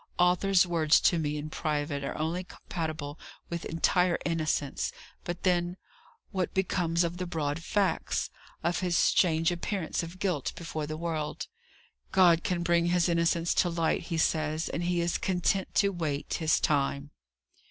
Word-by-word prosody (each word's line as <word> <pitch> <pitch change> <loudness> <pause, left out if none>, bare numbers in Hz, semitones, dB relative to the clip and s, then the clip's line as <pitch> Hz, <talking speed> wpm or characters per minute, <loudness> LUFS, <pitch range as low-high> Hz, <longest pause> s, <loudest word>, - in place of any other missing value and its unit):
"Arthur's 180 +1 +4
words 165 -3 +4
to 170 - +3
me 150 -1 -1
in 150 +1 -5
private 145 -3 -2
are - - -4
only 165 +4 -1
compatible 155 -5 -5 0.3
with 170 -1 -3
entire 175 +2 +2
innocence; 155 - -1 0.3
but 175 0 -5
then, 175 -1 +1 0.5
what 185 -3 -2
becomes 175 -3 +1
of 170 +1 -2
the 180 0 -3
broad 155 -2 -2
facts? 195 -2 0 0.3
of 170 0 +1
his 180 -2 +1
strange 165 -2 +3
appearance 175 0 -2
of 170 +2 -8
guilt 180 -8 -1
before 160 -3 -4
the 155 0 -4
world? 160 -2 -3 0.7
God 175 -3 +5
can 175 -2 -1
bring 170 0 +2
his 175 0 +3
innocence 170 0 +2
to 175 - +2
light, 165 -1 0
he 165 - -1
says; 155 0 0
and 175 - -2
he 175 -1 +1
is 170 0 0
content 190 +1 0
to 200 - +4
wait 155 -6 -3
His 160 -1 +2
time." 140 0 0
170 Hz, 155 wpm, -29 LUFS, 155-180 Hz, 0.7 s, God